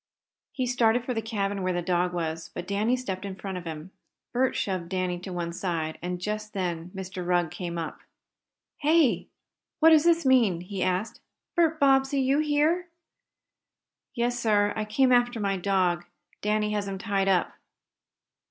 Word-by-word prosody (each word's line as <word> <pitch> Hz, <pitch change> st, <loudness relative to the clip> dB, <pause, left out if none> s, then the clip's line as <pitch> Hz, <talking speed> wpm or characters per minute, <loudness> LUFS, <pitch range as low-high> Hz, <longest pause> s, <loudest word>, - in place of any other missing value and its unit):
He 255 Hz, -, -2 dB
started 240 Hz, -1 st, +2 dB
for 250 Hz, -, -1 dB
the 225 Hz, -, -1 dB
cabin 205 Hz, -3 st, -2 dB
where 185 Hz, 0 st, 0 dB
the 175 Hz, 0 st, -2 dB
dog 180 Hz, 0 st, +1 dB
was, 160 Hz, -2 st, -3 dB
but 175 Hz, -, -4 dB
Danny 205 Hz, +5 st, +1 dB
stepped 195 Hz, -7 st, -4 dB
in 195 Hz, -1 st, -5 dB
front 195 Hz, 0 st, -6 dB
of 175 Hz, -, -12 dB
him. 160 Hz, +2 st, -7 dB, 0.4 s
Bert 255 Hz, +1 st, +1 dB
shoved 185 Hz, -4 st, -2 dB
Danny 185 Hz, -2 st, -1 dB
to 185 Hz, +1 st, -8 dB
one 170 Hz, -1 st, -3 dB
side, 165 Hz, -3 st, -3 dB
and 180 Hz, +1 st, -3 dB
just 210 Hz, +3 st, -4 dB
then 175 Hz, -3 st, -3 dB
Mr. 190 Hz, -1 st, -5 dB
Rugg 175 Hz, -2 st, +1 dB
came 170 Hz, -2 st, -5 dB
up. 165 Hz, -1 st, -5 dB, 0.8 s
"Here! 305 Hz, -3 st, +3 dB, 0.5 s
What 325 Hz, +1 st, +7 dB
does 315 Hz, 0 st, +6 dB
this 335 Hz, -2 st, +4 dB
mean?" 230 Hz, -10 st, +4 dB
he 185 Hz, +1 st, -5 dB
asked. 185 Hz, +4 st, -1 dB, 0.4 s
"Bert 325 Hz, -2 st, +2 dB
Bobbsey, 270 Hz, 0 st, +4 dB
you 270 Hz, +2 st, +2 dB
here?" 310 Hz, +4 st, +2 dB, 1.3 s
"Yes, 240 Hz, 0 st, 0 dB
sir. 205 Hz, -3 st, +2 dB
I 215 Hz, -, -2 dB
came 255 Hz, +5 st, +2 dB
after 245 Hz, -1 st, +3 dB
my 200 Hz, -2 st, 0 dB
dog. 180 Hz, -2 st, +1 dB, 0.4 s
Danny 210 Hz, 0 st, +1 dB
has 205 Hz, -1 st, -1 dB
him 195 Hz, -1 st, -4 dB
tied 195 Hz, -1 st, 0 dB
up!" 185 Hz, -2 st, +2 dB
200 Hz, 170 wpm, -27 LUFS, 180-245 Hz, 1.3 s, What